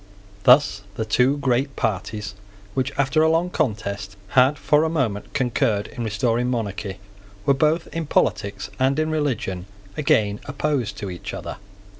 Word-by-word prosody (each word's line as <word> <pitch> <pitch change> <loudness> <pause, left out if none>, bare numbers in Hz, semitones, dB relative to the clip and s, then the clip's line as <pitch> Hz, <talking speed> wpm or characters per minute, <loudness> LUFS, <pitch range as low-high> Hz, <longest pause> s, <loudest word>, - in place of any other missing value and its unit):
Thus 125 -6 +6
the 110 - -2
two 125 +6 +3
great 135 0 0
parties, 105 0 -2 0.4
which, 130 +1 0
after 140 +3 +2
a 160 - +5
long 165 +2 +1
contest, 100 - -2
had 130 +5 +4
for 150 +2 +3
a 160 - +1
moment 125 -11 -1
concurred 115 -5 +1
in 120 - -5
restoring 115 +3 0
monarchy, 100 -5 -3 0.5
were, 140 - +5
both 155 +4 +2
in 165 -2 -3
politics 100 -7 0
and 135 +2 +2
in 155 0 +1
religion, 110 - -2 0.3
again 105 -8 +2
opposed 140 -7 -1
to 100 -2 -5
each 90 - -6
other. - - -6
125 Hz, 150 wpm, -23 LUFS, 105-145 Hz, 0.5 s, Thus